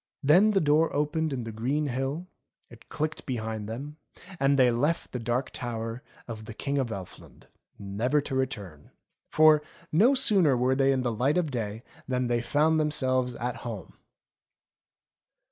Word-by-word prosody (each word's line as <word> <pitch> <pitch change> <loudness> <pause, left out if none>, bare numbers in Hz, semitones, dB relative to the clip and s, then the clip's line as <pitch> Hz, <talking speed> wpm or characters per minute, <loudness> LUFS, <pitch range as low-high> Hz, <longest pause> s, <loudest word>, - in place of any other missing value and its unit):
Then 175 +10 +6
the 205 -2 +3
door 155 0 +3
opened 150 +2 0
in 130 -3 -3
the 115 - -6
green 130 +8 -1
hill, 135 +5 -3 0.5
it 115 -1 -16
clicked 155 +1 -3
behind 110 -4 -4
them, 140 +7 -6 0.4
and 140 0 +3
they 125 -2 +5
left 145 +8 -1
the 125 - -4
Dark 120 +3 -2
Tower 115 -1 -5 0.3
of 110 -2 -7
the 110 - -9
King 140 +2 -2
of 130 - 0
Elfland 95 -4 -10 0.3
never 110 +9 0
to 145 -1 -5
return. 105 - -4 0.4
For, 155 -1 +6 0.3
no 225 - +5
sooner 195 - +4
were 125 +2 +2
they 135 0 +3
in 130 -2 0
the 120 -2 -1
light 135 +9 +1
of 165 -5 0
day, 110 -2 -4 0.2
than 125 -1 0
they 120 -1 +1
found 155 +5 +2
themselves 130 -5 +1
at 120 0 -3
home. 115 -4 -7
130 Hz, 160 wpm, -27 LUFS, 115-150 Hz, 0.5 s, Then